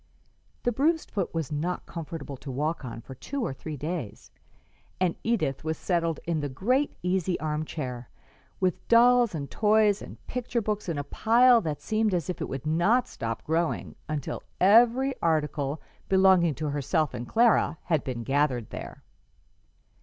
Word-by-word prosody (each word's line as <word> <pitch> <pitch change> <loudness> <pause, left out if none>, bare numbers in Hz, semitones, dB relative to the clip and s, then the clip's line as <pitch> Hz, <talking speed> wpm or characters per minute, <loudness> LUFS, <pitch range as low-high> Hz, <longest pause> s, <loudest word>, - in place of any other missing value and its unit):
The 245 - +2
bruised 310 +7 +1
foot 195 -4 -2
was 160 -4 -3
not 165 +5 -2
comfortable 160 -4 -6
to 135 - -10
walk 150 +5 -2
on 115 -2 -6
for 130 - -10
two 260 - -4
or - - -3
three 150 +3 -7
days, 150 - -5 0.7
and 180 -2 +1
Edith 200 - 0
was 160 0 -2
settled 165 -3 0
in 165 -2 0
the 145 -1 -2
great 250 - 0
easy 180 -1 0
arm 155 0 -2
chair 125 -6 -5 0.5
with 185 -2 -1
dolls 240 -2 +5
and 140 -3 -5
toys 210 -1 +3
and - - -9
picture 245 -1 -2
books 210 -3 -2
in 165 - -2
a 145 - -2
pile 235 - +4
that 155 -6 -4
seemed 215 -3 +1
as 175 0 -1
if 180 - -8
it - - -3
would 135 0 -5
not 175 +11 +2
stop 115 0 -5
growing 165 +1 -1
until 150 -3 -3 0.2
every 240 +7 +5
article 150 -3 0 0.3
belonging 190 -5 +5
to 155 +1 -3
herself 145 +2 0
and 120 -1 -5
Clara 230 - +3
had 160 -4 0
been 120 -3 -4
gathered 135 -3 0
there. - - -8
165 Hz, 165 wpm, -27 LUFS, 145-215 Hz, 0.7 s, dolls